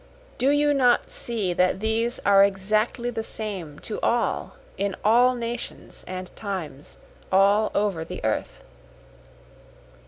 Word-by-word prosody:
Do 260 +3 +3
you 290 0 +3
not 250 -3 +3
see 215 -7 -2
that 180 +1 +2
these 225 +3 0
are 195 -1 +7
exactly 215 +5 0
the 225 - -3
same 195 -10 -5
to 215 - -5
all 240 0 0 0.2
in 200 -1 -2
all 245 +4 +5
nations 235 0 -6
and 185 0 -7
times 180 -9 -6 0.3
all 200 +3 +4
over 200 -6 0
the - - -7
earth? - - -2
215 Hz, 125 wpm, -25 LUFS, 190-235 Hz, 0.3 s, are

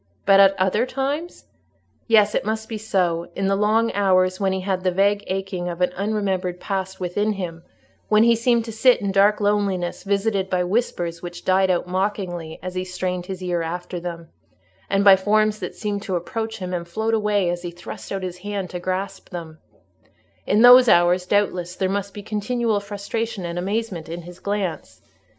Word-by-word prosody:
But 195 0 +6
at 195 -1 +5
other 200 +6 +2
times? 285 +6 -3 0.6
Yes, 215 -3 +5
it - - 0
must 220 +1 -3
be 220 -2 -5
so: 180 -5 0
in 195 - -1
the 195 0 +2
long 220 +3 +2
hours 185 -2 +2
when 195 -1 +1
he 190 0 -2
had 185 -1 -2
the 185 - +3
vague 200 +3 +2
aching 190 -2 -3
of 170 0 -6
an 180 0 +1
unremembered 195 -3 -1
past 190 -1 -4
within 205 +4 -1
him—when 185 +4 -2
he 235 0 +5
seemed 235 0 +2
to 225 - -6
sit 245 +3 +4
in 200 -1 -2
dark 200 +2 +4
loneliness, 200 -4 0
visited 200 -1 0
by 180 -1 +1
whispers 175 -4 -1
which 175 0 -8
died 190 0 +3
out 180 -1 +1
mockingly 180 -3 -3
as 185 0 -5
he 185 0 -2
strained 180 -1 -4
his 190 -1 -6
ear 175 -1 -1
after 175 +2 -4
them, 170 -1 -7 0.6
and 195 0 +2
by 200 -1 +9
forms 215 +2 +1
that - - -6
seemed 205 -1 -3
to 195 -3 -3
approach 220 +6 -3
him 185 -3 -5
and 170 -1 -3
float 220 +5 -2
away 210 -4 +1
as 175 0 -4
he 175 - -5
thrust 170 0 -9
out 195 -1 -3
his 180 -1 -5
hand 200 -1 -4
to 180 - -4
grasp 185 +2 -4
them—in 170 +5 -5
those 250 0 +9
hours, 175 0 +4
doubtless, 180 -3 0
there 190 - 0
must 200 +1 -2
be 205 0 -9
continual 220 +1 -1
frustration 200 0 -4
and 170 +1 -3
amazement 195 -3 -3
in 170 +1 -6
his 175 +1 -12
glance. 200 -4 -3
195 Hz, 185 wpm, -22 LUFS, 180-210 Hz, 0.6 s, by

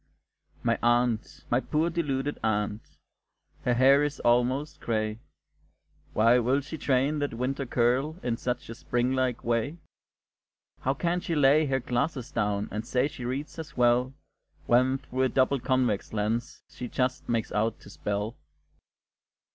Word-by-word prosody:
My - - +1
aunt, 120 -1 +1
my 120 - +4
poor 155 +5 0
deluded 145 -4 -1
aunt! 105 -1 -2 0.7
Her 125 - +3
hair 135 +3 +6
is 145 -1 -2
almost 125 +5 +1
gray; 110 -1 -1 0.9
Why 115 +3 +5
will 130 +4 +2
she 140 +4 -7
train 140 +3 +1
that 145 -5 -2
winter 130 +3 -2
curl 125 +6 +1
In 120 -2 0
such 125 +1 -3
a - - -4
spring 120 +2 -1
like 130 -2 0
way? 120 +7 0 1.0
How 135 +1 0
can 175 +4 0
she 170 -1 -2
lay 145 +1 +5
her 135 -1 +1
glasses 125 +1 -2
down, 105 -2 0
And 105 +1 -3
say 125 +3 +1
she 130 -4 -8
reads 140 +6 -4
as 150 -2 -8
well, 125 +1 +3 0.5
When, 130 +2 +3
through 130 -1 -4
a 130 - +3
double 130 +2 +2
convex 125 -6 0
lens, 110 +3 -2
She 125 - -7
just 130 +1 -2
makes 115 -2 0
out 110 +1 0
to - - -13
spell? 105 +3 -3
125 Hz, 150 wpm, -28 LUFS, 115-135 Hz, 1.0 s, hair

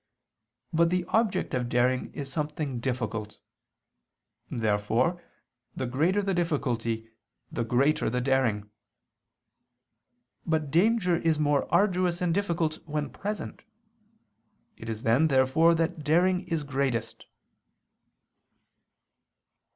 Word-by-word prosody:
But 165 +1 +4
the 180 0 0
object 225 -3 +1
of 125 -2 -1
daring 125 +1 +1
is 135 -1 -6
something 150 -4 -3
difficult. 115 -4 -3 1.1
Therefore 115 - 0 0.5
the 130 - -2
greater 160 +11 +1
the 195 0 0
difficulty, 120 -10 -1 0.4
the 120 - -2
greater 135 +6 +2
the 125 +2 -1
daring. 125 -6 0 1.7
But 155 -3 -1
danger 180 +1 +3
is 165 -2 +1
more 145 -2 +1
arduous 180 -3 +2
and 175 -2 +1
difficult 170 -5 -1
when 150 -1 -3
present. 210 +1 -5 1.1
It 115 - -9
is 110 0 -5
then 120 +8 +4
therefore 140 +5 +4
that 165 -1 -1
daring 180 +5 +2
is 165 -3 -1
greatest. 135 -4 -2
150 Hz, 105 wpm, -27 LUFS, 125-170 Hz, 1.7 s, But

